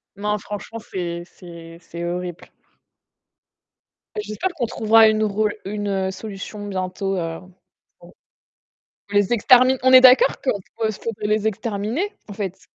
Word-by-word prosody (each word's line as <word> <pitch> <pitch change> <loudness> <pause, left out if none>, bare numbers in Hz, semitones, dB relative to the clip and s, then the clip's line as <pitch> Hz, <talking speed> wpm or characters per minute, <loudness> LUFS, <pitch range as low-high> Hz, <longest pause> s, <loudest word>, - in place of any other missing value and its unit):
Non, 210 +1 -1
franchement, 210 +3 -7
c'est 175 -4 -5
c'est 170 -2 -13
c'est 170 +1 -8
horrible. 175 0 -5 1.7
J'espère 375 - -3
qu'on 245 -6 -1
trouvera 220 0 +5
une 215 0 +2
ro 210 0 +1 0.2
une 195 -2 -2
solution 205 0 -8
bientôt, 190 0 -3
heu, 165 -1 -3 0.6
pour - - -16 1.0
pour 205 - -3
les 205 +3 +1
extermin 255 +3 +5
on 260 0 +4
est 255 - +10
d'accord 255 +1 +6
qu'on 215 -6 0 0.2
peut? 220 -1 +1
Faudrait 210 0 -5
les 215 0 0
exterminer, 220 - -2 0.2
en 205 - -7
fait? 195 -2 -5
205 Hz, 135 wpm, -21 LUFS, 190-220 Hz, 1.7 s, est